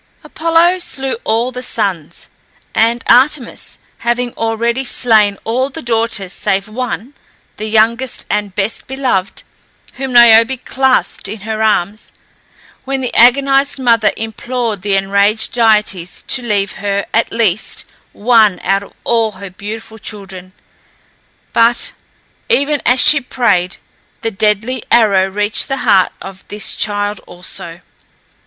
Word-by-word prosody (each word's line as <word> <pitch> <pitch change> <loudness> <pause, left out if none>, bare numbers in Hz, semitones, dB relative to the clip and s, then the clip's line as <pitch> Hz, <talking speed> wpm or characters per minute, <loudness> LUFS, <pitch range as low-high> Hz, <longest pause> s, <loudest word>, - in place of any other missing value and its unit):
Apollo 335 +3 +1
slew 270 -6 -2
all 230 +3 0
the 250 0 -7
sons, 195 -10 -3 0.5
and 230 +2 +1
Artemis 255 +1 +1 0.2
had 240 +1 0 0.2
already 235 +3 -1
slain 215 -5 +3
all 255 +4 -1
the 265 - -9
daughters 225 -5 -1
save 195 -1 -1
one, 250 +3 -5 0.4
the 215 - -5
youngest 230 +4 +1
and 205 -3 -2
best 205 +2 -2
beloved, 255 -8 -2 0.5
whom 265 0 -4
Niobe 235 +1 +5
clasped 265 -5 +1
in 210 +1 -7
her 220 +1 -4
arms, 210 -1 0 0.7
when 270 0 -3
the 250 - -3
agonized 275 +3 +4
mother 230 -4 +2
implored 225 -1 -4
the 200 0 0
enraged 200 +3 +1
deities 210 -6 +1
to 260 - -1
leave 205 -4 -1
her, 200 0 -1
at 230 - +1
least, 215 -3 -1 0.3
one 220 -4 +3
out 195 +1 +1
of 200 - -14
all 225 -2 0
her 195 0 -9
beautiful 220 +3 -8
children; 190 -3 -8 1.0
but, 230 +1 +2 0.6
even 285 +1 +1
as 250 +1 +4
she 300 +2 +7
prayed, 205 -8 0 0.4
the 225 - -2
deadly 215 +4 0
arrow 200 -5 +4
reached 205 +2 0
the 270 -1 -2
heart 190 -2 +4
of 190 -1 -10
this 210 0 -2
child 205 -1 -2
also. 175 -1 -9
225 Hz, 130 wpm, -15 LUFS, 200-250 Hz, 1.0 s, she